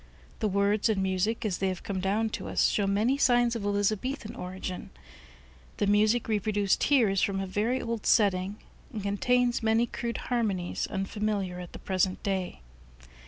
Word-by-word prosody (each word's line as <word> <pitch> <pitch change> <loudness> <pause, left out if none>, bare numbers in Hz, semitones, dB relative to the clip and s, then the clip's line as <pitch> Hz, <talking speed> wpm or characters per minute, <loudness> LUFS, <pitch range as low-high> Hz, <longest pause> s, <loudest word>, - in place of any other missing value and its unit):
The 220 - +1
words 200 +2 +2
and 195 -3 +1
music, 190 +5 0
as 195 -4 -1
they 195 - +1
have 185 -2 -3
come 195 -2 -3
down 210 +4 0
to - - -5
us, - - +2
show 200 -2 0
many 220 +8 +1
signs 240 -3 +3
of 225 - -4
Elizabethan 215 +4 -1
origin. 185 -1 -6 0.9
The - - +1
music 215 +3 +3
reproduced 205 -2 +1
here 265 -6 +4
is 195 -1 +1
from 195 -1 0
a 195 - -2
very 215 +7 0
old 230 -2 -3
setting 195 -2 +3 0.4
and 215 -5 -5
contains 240 +5 +1
many 225 +1 +3
crude 235 0 -4
harmonies 210 -8 -1
unfamiliar 195 -2 -2
at 180 -1 -9
the - - -7
present 185 -1 -1
day. 190 - -2
205 Hz, 165 wpm, -28 LUFS, 195-225 Hz, 0.9 s, here